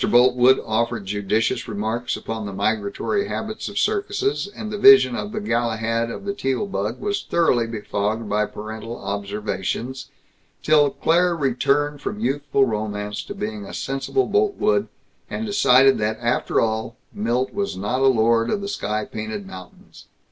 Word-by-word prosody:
Boltwood 125 +1 +5
offered 115 -1 -1
judicious 105 +4 -1
remarks 110 +3 -2
upon 110 -2 -5
the 100 - -6
migratory 110 - -1
habits 215 +1 -4
of - - -8
circuses, 405 - 0
and 210 +1 -7
the 210 - -3
vision 200 -12 +7
of 205 - -4
the 215 - -3
Galahad 115 - -1
of 200 - -7
the 200 - -1
Teal 135 -5 -1
bug 110 - -3
was 205 0 -1
thoroughly 125 -9 +2
befogged 110 0 -2
by 105 +1 +1
parental 110 +2 -7
observations, 100 +5 -4 0.6
till 150 -2 +5
Claire 175 +4 +2
returned 145 +1 0
from 210 - -4
youthful 140 -7 +1
romance 105 -2 -3
to - - -8
being 105 -1 -4
a 100 - -8
sensible 135 - -1
Boltwood, 420 +1 +1 0.4
and 225 - -3
decided 135 - +5
that 110 +1 -1
after 120 +1 0
all, 110 +1 -1 0.2
Milt 120 +5 -1
was 200 - -2
not 120 +7 -1
a 135 - +5
lord 115 -2 +3
of 200 - -1
the 200 - -4
sky 105 - -2
painted 110 -2 -6
mountains. 95 -1 -13
120 Hz, 155 wpm, -22 LUFS, 110-160 Hz, 0.6 s, vision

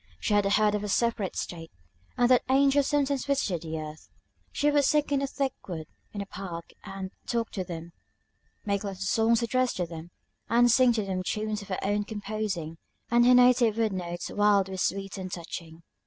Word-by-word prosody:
She 210 - -1
had 205 -1 +3
heard 210 -1 +3
of 210 0 -1
a - - -3
separate 230 -2 0
state, 165 -2 -5 0.5
and 245 - +4
that 250 - +6
angels 275 +1 +4
sometimes 280 -2 +1
visited 240 - 0
this 160 -1 -5
earth. 155 0 -9 0.4
She 295 0 +1
would 290 -1 +3
sit 295 +1 +2
in 280 -1 +2
a 275 - 0
thick 270 -1 -2
wood 165 -4 -5 0.3
in 205 - -5
the - - -4
park, 180 -4 -7
and 195 -1 -6 0.2
talk 230 -2 -1
to 190 - -3
them; 170 -1 -7 0.7
make 200 -1 0
little 195 -2 -5
songs 225 +4 +2
addressed 255 +1 0
to 180 - 0
them, 165 0 -9 0.4
and 240 +1 +5
sing 255 0 +5
them 195 -4 -2
to 185 - -2
tunes 215 0 -2
of 200 - -11
her 190 - -2
own 205 +1 +1
composing; 205 -6 -4 0.3
and 240 0 +5
her 250 - +7
native 245 -3 +5
wood 220 -3 +1
notes 175 -1 -4
wild 205 -2 +3
were 190 - -5
sweet 195 +1 -2
and 185 -1 -6
touching. 165 -1 -7
205 Hz, 200 wpm, -28 LUFS, 185-240 Hz, 0.7 s, her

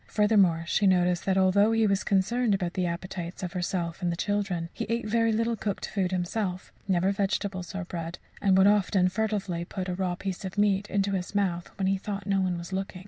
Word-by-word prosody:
Furthermore, 200 -6 +3
she 200 +4 +2
noticed 180 -2 +2
that 190 0 +2
although 200 +3 +4
he 225 -1 +3
was 195 -2 +1
concerned 210 +3 +2
about 180 -3 -2
the 185 -2 0
appetites 175 +1 -5
of 180 - -4
herself 175 -1 -2
and 175 -1 0
the - - -2
children, 190 -3 -1
he - - -4
ate 230 -1 -1
very 230 +1 +2
little 230 +1 +1
cooked 205 -2 -3
food 190 -3 -1
himself 185 +1 -2
never 190 0 +2
vegetables 195 -1 -2
or 195 -2 -3
bread 170 -1 -5 0.2
and 195 -2 +4
would 190 - +6
often 200 -2 +3
furtively 195 -4 -2
put 185 +1 -5
a 180 - -2
raw 180 -1 -1
piece 190 +1 -5
of 190 +1 -6
meat 205 -1 +2
into 200 0 0
his 190 0 -3
mouth 180 -4 0
when 195 - -1
he 195 0 +1
thought 200 0 -5
no 195 -1 +1
one 180 -2 0
was 170 +2 -7
looking. 190 -1 -3
190 Hz, 215 wpm, -27 LUFS, 180-205 Hz, 0.2 s, would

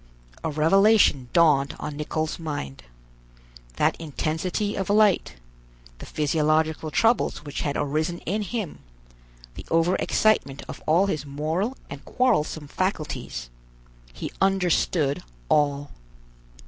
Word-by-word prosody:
A - - -1
revelation 160 - +4
dawned 150 -5 +3
on 150 - -5
Nicholl's 155 +2 -3
mind. 145 - -5 0.9
That - - +2
intensity 165 +7 -2
of 195 - -3
light, 210 - +3 0.6
the - - -9
physiological 155 +1 +1
troubles 225 -4 +1
which 145 - -4
had 145 -2 -1
arisen 155 +4 -1
in 205 +5 -2
him, 210 -4 -4 0.7
the - - -9
overexcitement 165 -2 +1
of - - -8
all 170 +5 +4
his 155 -8 -2
moral 155 - -2
and - - -9
quarrelsome 160 - 0
faculties—he - - -6
understood 180 -6 +2 0.3
all. 145 -1 +1
155 Hz, 105 wpm, -25 LUFS, 145-190 Hz, 0.9 s, revelation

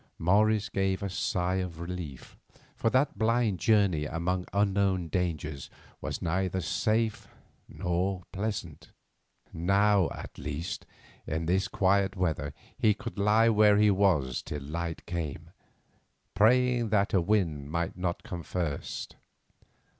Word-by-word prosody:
Morris 105 +4 +3
gave 95 0 -1
a 100 - -3
sigh 90 0 0
of 90 -3 -4
relief, 85 -6 -7 0.4
for 115 - +1
that 130 +4 +1
blind 115 -4 +2
journey 100 -9 +3
among 90 +3 -2
unknown 100 -3 +1
dangers 80 -6 -2 0.3
was - - -4
neither 95 +2 0
safe 110 +4 0 0.4
nor 90 +1 -1
pleasant. 100 -6 -4 0.6
Now, 100 +2 +3
at - - -9
least, 75 +4 -5 0.4
in 80 +2 -2
this 95 +3 +1
quiet 95 0 +2
weather 80 -6 -1 0.2
he 105 -2 +3
could 120 -2 -7
lie 110 +3 +4
where 105 -2 +5
he 105 0 +5
was 85 -11 +2
till 75 -1 -6
light 85 +3 -4
came, 85 -5 -5 0.8
praying 125 +1 +3
that 100 -1 +2
a 95 - +4
wind 85 -7 0
might 85 +1 -2
not 90 -1 -3
come 90 -1 -6
first. 85 -4 -4
95 Hz, 125 wpm, -29 LUFS, 85-105 Hz, 0.8 s, where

